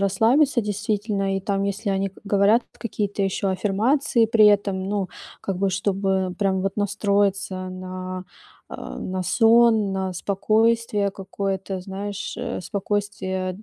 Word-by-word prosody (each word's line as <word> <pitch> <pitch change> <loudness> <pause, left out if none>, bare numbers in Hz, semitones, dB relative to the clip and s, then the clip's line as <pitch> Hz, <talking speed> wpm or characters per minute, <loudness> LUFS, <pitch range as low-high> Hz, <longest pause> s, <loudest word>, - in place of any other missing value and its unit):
расслабиться, 235 +8 +3
действительно. 205 -1 -1
И - - -2
там, 195 0 -1
если 200 +1 -2
они 195 0 0
к 190 - -19
говорят 200 +4 +4 0.2
какие-то 205 -3 -2
ещё 195 +1 0
аффирмации 225 +6 +2
при 215 -1 +5
этом, 200 -2 +2
ну, 200 -2 -1 0.3
как 195 -2 -3
бы 195 0 +1
чтобы 190 -1 0
прям 190 -2 +1
вот 195 - -2
настроиться 200 -2 0
на, 185 0 -6 0.5
э, - - -7 0.2
на 185 0 -3
сон, 225 -1 +4
на 190 -1 -2
спокойствие 215 +2 +1
какое-то, 195 -1 -4
знаешь, 200 +2 -5
э, 245 -4 -4
спокойствие 195 -2 -2
200 Hz, 130 wpm, -23 LUFS, 190-210 Hz, 0.5 s, при